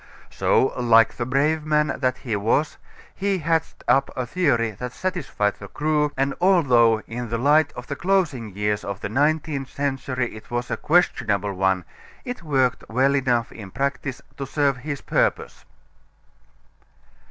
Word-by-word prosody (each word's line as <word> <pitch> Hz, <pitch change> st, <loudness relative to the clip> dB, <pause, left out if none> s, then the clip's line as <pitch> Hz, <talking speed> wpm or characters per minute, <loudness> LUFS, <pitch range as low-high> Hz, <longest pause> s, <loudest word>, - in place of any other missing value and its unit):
So, 130 Hz, -, +2 dB
like 115 Hz, -2 st, +5 dB
the 120 Hz, -, -2 dB
brave 150 Hz, +4 st, +1 dB
man 150 Hz, 0 st, +1 dB
that 130 Hz, -2 st, 0 dB
he 115 Hz, -5 st, -3 dB
was, 115 Hz, +9 st, 0 dB, 0.4 s
he 195 Hz, 0 st, -1 dB
hatched 165 Hz, -1 st, -1 dB
up 135 Hz, 0 st, +3 dB
a 130 Hz, -, -1 dB
theory 120 Hz, -6 st, +1 dB
that 125 Hz, +5 st, -7 dB
satisfied 150 Hz, -, -2 dB
the 100 Hz, -, -8 dB
crew, 150 Hz, +3 st, 0 dB
and 135 Hz, +1 st, +1 dB
although 125 Hz, -, +4 dB
in 120 Hz, 0 st, -6 dB
the 115 Hz, -, -1 dB
light 145 Hz, +4 st, +3 dB
of 125 Hz, -, -8 dB
the 140 Hz, -, -5 dB
closing 160 Hz, -, 0 dB
years 105 Hz, 0 st, -1 dB
of 100 Hz, -1 st, -5 dB
the -, -, -3 dB
nineteenth 145 Hz, +2 st, 0 dB
century 135 Hz, -3 st, -2 dB
it 110 Hz, -, -12 dB
was 120 Hz, 0 st, -3 dB
a -, -, +1 dB
questionable 110 Hz, -, +1 dB
one, 95 Hz, -1 st, 0 dB, 0.4 s
it 245 Hz, -6 st, -5 dB
worked 135 Hz, -6 st, +1 dB
well 130 Hz, +5 st, +2 dB
enough 125 Hz, -4 st, +1 dB
in 100 Hz, -4 st, -10 dB
practice 135 Hz, +2 st, -3 dB
to 135 Hz, -, -5 dB
serve 140 Hz, -2 st, +1 dB
his 140 Hz, +2 st, -5 dB
purpose. -, -, -1 dB
135 Hz, 155 wpm, -23 LUFS, 115-150 Hz, 0.4 s, like